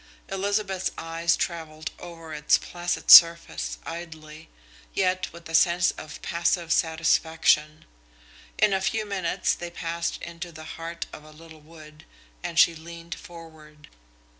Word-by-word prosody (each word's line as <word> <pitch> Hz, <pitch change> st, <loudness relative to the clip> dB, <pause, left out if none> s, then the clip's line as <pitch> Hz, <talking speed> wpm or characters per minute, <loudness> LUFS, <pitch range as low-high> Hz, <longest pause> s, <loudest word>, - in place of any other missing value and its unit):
Elizabeth's 195 Hz, -1 st, -1 dB
eyes 165 Hz, +1 st, 0 dB
travelled 160 Hz, -2 st, -4 dB
over 165 Hz, -2 st, -10 dB
its 150 Hz, -1 st, +3 dB
placid 175 Hz, 0 st, -2 dB
surface 165 Hz, -, +7 dB
idly, 160 Hz, -2 st, -9 dB, 0.5 s
yet 185 Hz, -1 st, 0 dB
with 170 Hz, 0 st, -12 dB
a 165 Hz, -, -9 dB
sense 175 Hz, +1 st, +4 dB
of 155 Hz, 0 st, -10 dB
passive 170 Hz, 0 st, 0 dB
satisfaction. 160 Hz, -1 st, +1 dB, 0.7 s
In 210 Hz, -1 st, +3 dB
a 190 Hz, -, 0 dB
few 215 Hz, +3 st, -1 dB
minutes 195 Hz, -4 st, -1 dB
they 175 Hz, -, -6 dB
passed 170 Hz, 0 st, -4 dB
into 170 Hz, 0 st, -7 dB
the 155 Hz, -1 st, -11 dB
heart 165 Hz, +1 st, -7 dB
of -, -, -10 dB
a 155 Hz, -, -15 dB
little 160 Hz, 0 st, -15 dB
wood, 155 Hz, 0 st, -15 dB, 0.4 s
and 170 Hz, -1 st, -6 dB
she 170 Hz, 0 st, +6 dB
leaned 165 Hz, +1 st, -9 dB
forward. 160 Hz, -3 st, -13 dB
165 Hz, 135 wpm, -25 LUFS, 160-175 Hz, 0.7 s, surface